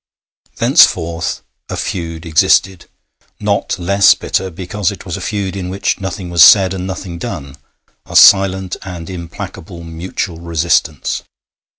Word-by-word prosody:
Thenceforth 85 Hz, +1 st, +2 dB, 0.3 s
a -, -, -4 dB
feud 85 Hz, -2 st, -5 dB
existed, 85 Hz, +3 st, +2 dB, 0.5 s
not -, -, -1 dB
less 100 Hz, +3 st, +4 dB
bitter 95 Hz, -, -2 dB
because 95 Hz, +2 st, -3 dB
it 100 Hz, -, -10 dB
was 90 Hz, -2 st, -4 dB
a 100 Hz, -, -7 dB
feud 95 Hz, 0 st, -3 dB
in 90 Hz, -2 st, -5 dB
which 100 Hz, +1 st, -2 dB
nothing 95 Hz, -2 st, -5 dB
was 85 Hz, -1 st, +3 dB
said 95 Hz, +2 st, +7 dB
and 95 Hz, -1 st, -5 dB
nothing 95 Hz, -2 st, -6 dB
done 70 Hz, -4 st, -6 dB, 0.5 s
a -, -, -9 dB
silent 95 Hz, -1 st, +5 dB
and 90 Hz, -2 st, -8 dB
implacable 85 Hz, 0 st, -8 dB
mutual 85 Hz, +1 st, -5 dB
resistance. 85 Hz, -3 st, -1 dB
90 Hz, 130 wpm, -15 LUFS, 85-95 Hz, 0.5 s, said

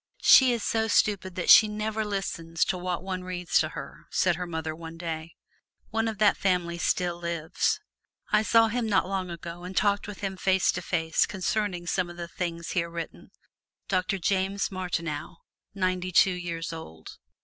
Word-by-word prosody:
"She 260 Hz, -2 st, +8 dB
is 235 Hz, -3 st, -1 dB
so 225 Hz, -1 st, +1 dB
stupid 195 Hz, -4 st, +1 dB
that 180 Hz, -, +3 dB
she 220 Hz, -, +9 dB
never 215 Hz, +1 st, -2 dB
listens 175 Hz, -5 st, -2 dB
to -, -, -1 dB
what 180 Hz, -1 st, -3 dB
one 185 Hz, -1 st, -4 dB
reads 180 Hz, -1 st, 0 dB
to 155 Hz, -, 0 dB
her," 140 Hz, -4 st, -9 dB
said 175 Hz, -2 st, +2 dB
her 180 Hz, +1 st, -4 dB
mother 160 Hz, -2 st, -4 dB
one 165 Hz, 0 st, -9 dB
day. 165 Hz, -1 st, -5 dB, 0.6 s
One 225 Hz, 0 st, 0 dB
of 220 Hz, -2 st, -3 dB
that 210 Hz, 0 st, +4 dB
family 175 Hz, -3 st, 0 dB
still 175 Hz, -1 st, 0 dB
lives. 170 Hz, -2 st, -1 dB, 0.5 s
I 210 Hz, -, +5 dB
saw 225 Hz, +1 st, +5 dB
him 235 Hz, 0 st, -1 dB
not 195 Hz, -, +2 dB
long 190 Hz, -1 st, -2 dB
ago 170 Hz, 0 st, -7 dB
and 180 Hz, +1 st, -7 dB
talked 205 Hz, 0 st, +2 dB
with 205 Hz, -2 st, -8 dB
him 195 Hz, -1 st, -3 dB
face 190 Hz, 0 st, +3 dB
to -, -, -4 dB
face 160 Hz, -2 st, +1 dB
concerning 190 Hz, -2 st, -2 dB
some 180 Hz, +1 st, 0 dB
of 175 Hz, -, -10 dB
the 170 Hz, -1 st, -5 dB
things 170 Hz, -1 st, -4 dB
here 170 Hz, -2 st, 0 dB
written 170 Hz, -1 st, -7 dB, 0.6 s
Doctor 185 Hz, 0 st, 0 dB
James 195 Hz, +2 st, 0 dB
Martineau, 175 Hz, -4 st, -3 dB, 0.4 s
ninety 185 Hz, -1 st, -1 dB
two 185 Hz, +1 st, +5 dB
years 170 Hz, -2 st, -4 dB
old. 80 Hz, -, -10 dB
180 Hz, 180 wpm, -27 LUFS, 170-195 Hz, 0.6 s, she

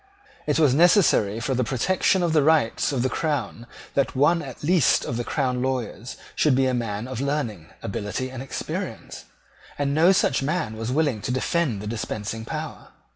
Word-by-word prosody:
It 150 Hz, -, +2 dB
was 150 Hz, -5 st, +4 dB
necessary 150 Hz, -, +4 dB
for 130 Hz, +3 st, -1 dB
the 125 Hz, 0 st, +1 dB
protection 180 Hz, -, +1 dB
of 170 Hz, -2 st, +1 dB
the 155 Hz, -, +4 dB
rights 150 Hz, -4 st, +2 dB
of 130 Hz, -4 st, -1 dB
the -, -, +2 dB
crown 135 Hz, -6 st, -3 dB, 0.3 s
that 140 Hz, -1 st, 0 dB
one 155 Hz, +6 st, +3 dB
at 130 Hz, -1 st, -9 dB
least 165 Hz, -4 st, +3 dB
of 120 Hz, -, -3 dB
the 120 Hz, -, -2 dB
crown 125 Hz, -2 st, -1 dB
lawyers 125 Hz, -3 st, -3 dB, 0.2 s
should 150 Hz, -4 st, +3 dB
be 135 Hz, 0 st, +3 dB
a 130 Hz, -, +1 dB
man 115 Hz, -2 st, -3 dB
of 130 Hz, -1 st, -4 dB
learning, 135 Hz, -, -2 dB, 0.2 s
ability, 105 Hz, +6 st, -3 dB
and 130 Hz, -1 st, -7 dB
experience; 135 Hz, -, -6 dB, 0.5 s
and 140 Hz, -1 st, 0 dB
no 165 Hz, +5 st, +5 dB
such 145 Hz, -8 st, +2 dB
man 150 Hz, -5 st, -2 dB
was 115 Hz, +2 st, -4 dB
willing 140 Hz, -6 st, +1 dB
to 125 Hz, -, -3 dB
defend 130 Hz, -, 0 dB
the -, -, -6 dB
dispensing 110 Hz, 0 st, -4 dB
power. -, -, -6 dB
130 Hz, 180 wpm, -24 LUFS, 115-150 Hz, 0.5 s, no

